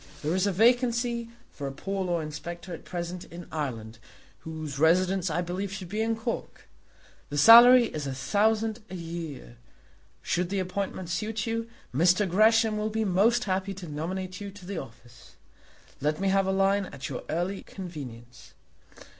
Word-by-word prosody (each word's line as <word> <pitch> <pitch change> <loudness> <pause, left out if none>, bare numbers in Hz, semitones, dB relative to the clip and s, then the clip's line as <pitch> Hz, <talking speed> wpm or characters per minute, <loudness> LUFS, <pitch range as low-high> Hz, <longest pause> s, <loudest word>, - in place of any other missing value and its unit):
There 155 +3 0
is 185 +2 +2
a - - +2
vacancy 235 +2 +2 0.2
for 140 - -6
a - - -4
poor 195 +7 -3
law 175 -2 0
inspector 170 +4 -7
at 165 - -9
present 175 0 -5
in 170 0 -10
Ireland, 115 -7 -4 0.4
whose 155 -3 -6
residence 180 +3 +3
I 175 +3 -1
believe 185 +3 -4
should 190 -2 -7
be 215 +3 -2
in 225 0 +1
Cork. 225 +1 -5 0.6
The 145 - -4
salary 240 - +9
is 150 -9 -5
a 135 - -3
thousand 220 - +1
a 185 - -6
year. 165 -7 -7 0.7
Should 175 0 0
the 200 - -1
appointment 185 -1 -3
suit 215 +3 -2
you, 230 0 -2 0.2
Mr. 180 +8 +3
Gresham 215 +3 +4
will 215 +1 -1
be 220 0 -1
most 215 +6 +3
happy 195 -1 -2
to 180 -2 -8
nominate 185 +5 -4
you 200 - -5
to 195 -2 -13
the 195 -1 -4
office. 120 -1 -15 0.6
Let 150 +2 0
me 195 0 +1
have 195 0 +2
a - - +2
line 195 0 +2
at 140 -4 -7
your 130 - -5
early 175 +4 -2
convenience. 130 - -10
185 Hz, 170 wpm, -27 LUFS, 160-210 Hz, 0.7 s, salary